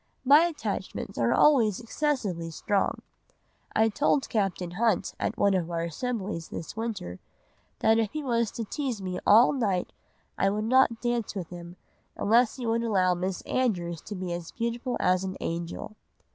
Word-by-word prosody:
My 290 +5 +7
attachments 335 -3 -4
are - - +2
always 235 -10 +4
excessively 230 - -2
strong. 195 +5 -1 0.7
I 220 - +4
told 280 +4 +1
Captain 195 -5 -1
Hunt 225 +5 +1
at 230 - -2
one 200 -1 +3
of 175 -3 0
our 165 -1 -2
assemblies 190 -1 -3
this 165 - -7
winter, 215 - -4 0.6
that 225 +1 +4
if 220 -2 +1
he 305 -1 -3
was 235 -4 +1
to 230 - -3
tease 255 -1 -3
me 185 -2 -4
all 230 +7 +7
night, 200 -9 -1 0.5
I 195 - +3
would 210 +2 -1
not 240 -1 +3
dance 240 -3 -1
with 180 -4 -5
him 175 0 -9 0.4
unless 230 +3 +3
he 255 - -6
would 230 0 +1
allow 190 -6 +2
Miss 180 +1 -3
Andrews 175 -10 -1
to 205 - -6
be 185 -2 -4
as 170 -1 -5
beautiful 235 +2 -2
as 185 +1 +2
an 190 0 -4
angel. 170 +5 -4
215 Hz, 165 wpm, -27 LUFS, 180-240 Hz, 0.7 s, My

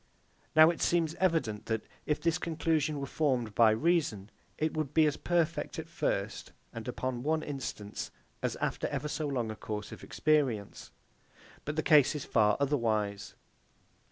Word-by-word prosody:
Now 155 +1 +8
it 170 - -7
seems 165 -2 +2
evident 160 - 0
that, 110 -1 -1 0.2
if 150 - +1
this 165 +1 +1
conclusion 160 -3 0
were 140 - -3
formed 130 -7 0
by 115 +1 +6
reason, 110 - +1 0.3
it 155 0 -1
would 155 -2 -3
be 160 -1 +6
as 150 - +1
perfect 170 -1 0
at - - -5
first, - - -2 0.2
and 115 0 -7
upon 125 0 -3
one 155 +3 0
instance, 125 -7 -5 0.3
as - - -1
after - - -2
ever 140 +2 -3
so 150 0 -2
long 120 -6 -1
a - - -6
course 105 -1 -5
of - - -10
experience. 135 -10 0 0.8
But 150 - -3
the 155 - 0
case 150 -1 +5
is 150 - -4
far 105 -2 +3
otherwise. 110 -8 0
140 Hz, 160 wpm, -31 LUFS, 110-155 Hz, 0.8 s, Now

